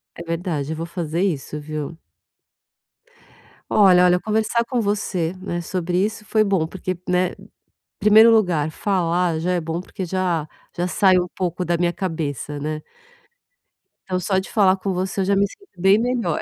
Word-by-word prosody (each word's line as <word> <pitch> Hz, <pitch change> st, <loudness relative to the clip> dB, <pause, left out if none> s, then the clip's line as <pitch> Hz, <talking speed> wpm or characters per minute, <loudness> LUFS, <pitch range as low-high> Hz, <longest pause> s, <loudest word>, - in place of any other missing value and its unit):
É 170 Hz, -, -8 dB
verdade, 165 Hz, -3 st, -3 dB
eu -, -, -5 dB
vou 165 Hz, +1 st, -4 dB
fazer 170 Hz, -1 st, -3 dB
isso 150 Hz, -5 st, -2 dB
viu? 155 Hz, +2 st, -6 dB, 1.7 s
Olha, 185 Hz, -3 st, +6 dB
olha, 180 Hz, 0 st, +4 dB
conversar 220 Hz, +3 st, 0 dB
com 245 Hz, 0 st, -1 dB
você 200 Hz, -5 st, -1 dB
né 175 Hz, -2 st, -4 dB
sobre 180 Hz, +1 st, -1 dB
isso 210 Hz, +1 st, -3 dB
foi 215 Hz, +1 st, +2 dB
bom 195 Hz, -6 st, +1 dB
porque, 185 Hz, +1 st, -5 dB
né, 180 Hz, 0 st, +1 dB, 0.7 s
primeiro 220 Hz, +2 st, +7 dB
lugar 180 Hz, -9 st, +3 dB
falar 175 Hz, -2 st, 0 dB
já 180 Hz, +3 st, 0 dB
é 180 Hz, -, +1 dB
bom 165 Hz, +1 st, -3 dB
porque 185 Hz, +1 st, -6 dB
já 175 Hz, -3 st, -1 dB, 0.3 s
já 175 Hz, +1 st, 0 dB
sai 190 Hz, 0 st, +4 dB
um 180 Hz, -, 0 dB
pouco 180 Hz, 0 st, -2 dB
da 170 Hz, 0 st, +1 dB
minha 175 Hz, 0 st, +1 dB
cabeça, 155 Hz, -5 st, -4 dB
né. 155 Hz, +1 st, -4 dB, 1.2 s
Então 185 Hz, -1 st, -2 dB
só 190 Hz, +2 st, 0 dB
de 190 Hz, -, -7 dB
falar 195 Hz, -3 st, +4 dB
com 195 Hz, 0 st, -3 dB
você 190 Hz, +2 st, -2 dB
eu -, -, 0 dB
já 200 Hz, +1 st, +2 dB
me 200 Hz, -, +4 dB
sinto 400 Hz, -, -18 dB
bem 195 Hz, +2 st, +6 dB
melhor. 235 Hz, -8 st, -1 dB
180 Hz, 170 wpm, -22 LUFS, 165-195 Hz, 1.7 s, primeiro